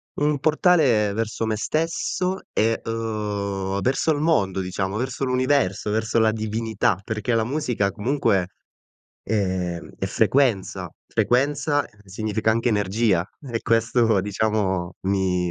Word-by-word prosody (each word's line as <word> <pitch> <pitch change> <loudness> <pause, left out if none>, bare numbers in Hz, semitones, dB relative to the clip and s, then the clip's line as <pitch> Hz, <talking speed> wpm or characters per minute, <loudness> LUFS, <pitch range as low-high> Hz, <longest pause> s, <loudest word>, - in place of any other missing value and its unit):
Un 145 -1 +1
portale 145 - +3
verso 115 +1 -2
me 110 - 0
stesso 165 - -1
e, 115 +1 +1
uhm, 105 -4 -2
verso 135 +5 +1
il 145 - 0
mondo, 105 - +1
diciamo, 95 +2 -2
verso 130 +2 -3
l'universo, 130 -6 +1
verso 110 +2 +1
la 110 -1 +4
divinità 110 -3 -1
perché 110 +3 -2
la 115 -1 +2
musica, 125 -7 0
comunque, 105 -4 +1 0.8
ehm, 95 -5 -2
è - - -2
frequenza. 125 -9 +1 0.2
Frequenza 145 +3 +1 0.2
significa 110 +3 -1
anche 115 +2 +1
energia 105 -3 +1
e 120 -5 -4
questo, 115 -2 +2
diciamo, 100 -3 -1
mi 95 -2 +1
110 Hz, 120 wpm, -23 LUFS, 100-130 Hz, 0.8 s, la